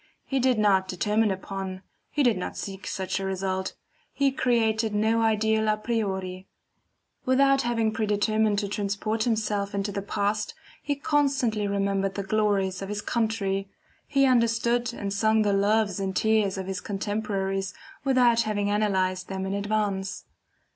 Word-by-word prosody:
He 270 Hz, -, 0 dB
did 255 Hz, -2 st, +3 dB
not 195 Hz, -3 st, +3 dB
determine 210 Hz, +4 st, +1 dB
upon, 190 Hz, 0 st, -5 dB, 0.3 s
he 295 Hz, -, +1 dB
did 245 Hz, -3 st, +4 dB
not 180 Hz, -, -5 dB
seek 195 Hz, -1 st, -6 dB
such 190 Hz, 0 st, -2 dB
a -, -, -4 dB
result; 190 Hz, 0 st, -2 dB, 0.4 s
he 280 Hz, -1 st, +2 dB
created 225 Hz, -4 st, +1 dB
no 220 Hz, +2 st, +2 dB
ideal 220 Hz, 0 st, +2 dB
a 215 Hz, 0 st, +2 dB
priori. 190 Hz, -5 st, -3 dB, 0.8 s
Without 275 Hz, +1 st, +4 dB
having 230 Hz, -2 st, +1 dB
predetermined 215 Hz, 0 st, +1 dB
to 200 Hz, 0 st, 0 dB
transport 205 Hz, +2 st, -1 dB
himself 210 Hz, -3 st, -1 dB
into 200 Hz, +1 st, -1 dB
the 200 Hz, -, -3 dB
past, 205 Hz, +1 st, -1 dB, 0.3 s
he 290 Hz, -1 st, -1 dB
constantly 275 Hz, -7 st, +1 dB
remembered 195 Hz, -1 st, 0 dB
the 200 Hz, -, -2 dB
glories 195 Hz, -2 st, +1 dB
of 195 Hz, -, -5 dB
his 210 Hz, 0 st, -3 dB
country, 200 Hz, -4 st, -1 dB, 0.4 s
he 275 Hz, -1 st, +3 dB
understood 235 Hz, -1 st, +2 dB
and 200 Hz, -4 st, -4 dB
sung 220 Hz, +2 st, +3 dB
the 205 Hz, -1 st, +2 dB
loves 205 Hz, 0 st, +2 dB
and 190 Hz, -1 st, -2 dB
tears 215 Hz, -3 st, +2 dB
of 190 Hz, -, -4 dB
his 190 Hz, -1 st, -4 dB
contemporaries 195 Hz, -2 st, -2 dB, 0.3 s
without 250 Hz, -4 st, +4 dB
having 205 Hz, -2 st, -1 dB
analyzed 190 Hz, -3 st, 0 dB
them 190 Hz, 0 st, -4 dB
in 190 Hz, -, -2 dB
advance. 200 Hz, -2 st, -2 dB
210 Hz, 150 wpm, -26 LUFS, 195-225 Hz, 0.8 s, did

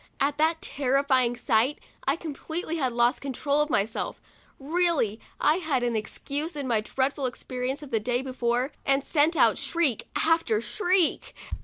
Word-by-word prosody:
At 285 Hz, +2 st, 0 dB
that 320 Hz, +1 st, +2 dB
terrifying 265 Hz, -2 st, +1 dB
sight, 240 Hz, +4 st, +2 dB, 0.3 s
I -, -, +3 dB
completely 330 Hz, +1 st, -4 dB
lost 245 Hz, -1 st, +1 dB
control 280 Hz, +2 st, 0 dB
of 300 Hz, -, 0 dB
myself; 220 Hz, -3 st, -1 dB, 0.4 s
really, 300 Hz, -, +1 dB, 0.2 s
I 305 Hz, +3 st, +3 dB
had 305 Hz, -8 st, 0 dB
an 240 Hz, -1 st, 0 dB
excuse 285 Hz, +9 st, -3 dB
in 285 Hz, -3 st, -3 dB
my 225 Hz, -3 st, +2 dB
dreadful 265 Hz, +4 st, -1 dB
experience 255 Hz, +3 st, -4 dB
of 285 Hz, -, -11 dB
the 225 Hz, -, +2 dB
day 245 Hz, +3 st, -1 dB
before, 250 Hz, 0 st, -1 dB
and 275 Hz, 0 st, +2 dB
sent 310 Hz, +3 st, +2 dB
out -, -, +4 dB
shriek 320 Hz, -10 st, 0 dB
after 325 Hz, -10 st, +2 dB
shriek. 355 Hz, -, 0 dB
275 Hz, 150 wpm, -27 LUFS, 245-310 Hz, 0.4 s, out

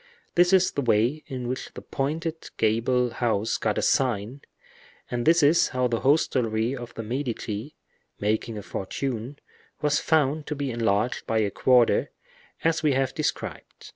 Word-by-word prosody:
This 175 Hz, +1 st, +4 dB
is 190 Hz, -1 st, +4 dB
the 140 Hz, -, -2 dB
way 120 Hz, +5 st, +2 dB
in 130 Hz, -4 st, -5 dB
which 130 Hz, +1 st, -5 dB
the -, -, -7 dB
pointed 160 Hz, +4 st, -3 dB
gable 120 Hz, +3 st, +2 dB
house 115 Hz, -2 st, 0 dB
got 105 Hz, -2 st, -1 dB
a -, -, 0 dB
sign; 125 Hz, 0 st, 0 dB, 0.7 s
and 120 Hz, +1 st, -2 dB
this 170 Hz, 0 st, +5 dB
is 155 Hz, +4 st, +5 dB
how 125 Hz, -1 st, 0 dB
the 115 Hz, -2 st, -1 dB
hostelry 125 Hz, -5 st, +1 dB
of 120 Hz, -2 st, -8 dB
the 115 Hz, -, -5 dB
Medici, 120 Hz, 0 st, -4 dB, 0.4 s
making 110 Hz, +2 st, -1 dB
a 105 Hz, -, -6 dB
fortune, 125 Hz, +7 st, -4 dB, 0.4 s
was 150 Hz, 0 st, +2 dB
found 150 Hz, -1 st, +1 dB
to 150 Hz, -, -3 dB
be 140 Hz, -2 st, -2 dB
enlarged 115 Hz, 0 st, 0 dB
by 115 Hz, -, +1 dB
a 105 Hz, -2 st, +1 dB
quarter, 125 Hz, +1 st, +3 dB, 0.5 s
as 165 Hz, 0 st, +2 dB
we 150 Hz, -3 st, +3 dB
have 135 Hz, 0 st, 0 dB
described. -, -, -4 dB
125 Hz, 160 wpm, -26 LUFS, 115-145 Hz, 0.7 s, this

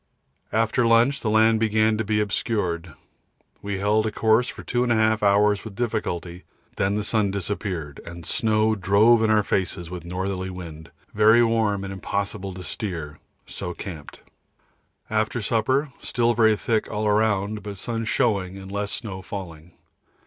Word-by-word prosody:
After 115 Hz, +2 st, +2 dB
lunch 115 Hz, +4 st, +4 dB
the 110 Hz, -, -1 dB
land 110 Hz, +1 st, +4 dB
began 110 Hz, 0 st, +2 dB
to -, -, +1 dB
be 105 Hz, 0 st, 0 dB
obscured. 95 Hz, -, -2 dB, 0.7 s
We 100 Hz, -1 st, -3 dB
held 105 Hz, +2 st, +2 dB
a -, -, -2 dB
course 110 Hz, +3 st, +3 dB
for -, -, -8 dB
2 120 Hz, -, -1 dB
1/2 110 Hz, -1 st, +2 dB
hours 105 Hz, 0 st, +3 dB
with 110 Hz, -3 st, -9 dB
difficulty, 90 Hz, -7 st, -3 dB, 0.3 s
then 100 Hz, +1 st, +1 dB
the 105 Hz, -, -1 dB
sun 105 Hz, -1 st, +1 dB
disappeared, 95 Hz, -6 st, -4 dB
and 85 Hz, 0 st, -9 dB
snow 110 Hz, +3 st, +1 dB
drove 110 Hz, +4 st, +4 dB
in 110 Hz, -, +2 dB
our 110 Hz, -1 st, +4 dB
faces 90 Hz, -3 st, -2 dB
with 90 Hz, -1 st, -6 dB
northerly 95 Hz, +2 st, -3 dB
wind 80 Hz, -4 st, -9 dB, 0.2 s
very 110 Hz, +3 st, +6 dB
warm 110 Hz, -4 st, +1 dB
and 95 Hz, 0 st, -5 dB
impossible 100 Hz, +1 st, -3 dB
to 90 Hz, -, -8 dB
steer, 85 Hz, -9 st, -5 dB, 0.3 s
so 90 Hz, -, -6 dB
camped. 80 Hz, -7 st, -9 dB, 0.9 s
After 110 Hz, +2 st, 0 dB
supper, 130 Hz, +6 st, 0 dB
still 120 Hz, -1 st, +1 dB
very 110 Hz, -2 st, +4 dB
thick 110 Hz, +1 st, -1 dB
all 105 Hz, 0 st, -1 dB
round, 105 Hz, 0 st, +1 dB
but 100 Hz, -1 st, -7 dB
sun 115 Hz, +2 st, -3 dB
showing 100 Hz, -6 st, 0 dB
and 95 Hz, 0 st, -9 dB
less 100 Hz, 0 st, -2 dB
snow 95 Hz, -4 st, -5 dB
falling. 85 Hz, -4 st, -8 dB
105 Hz, 155 wpm, -24 LUFS, 95-110 Hz, 0.9 s, very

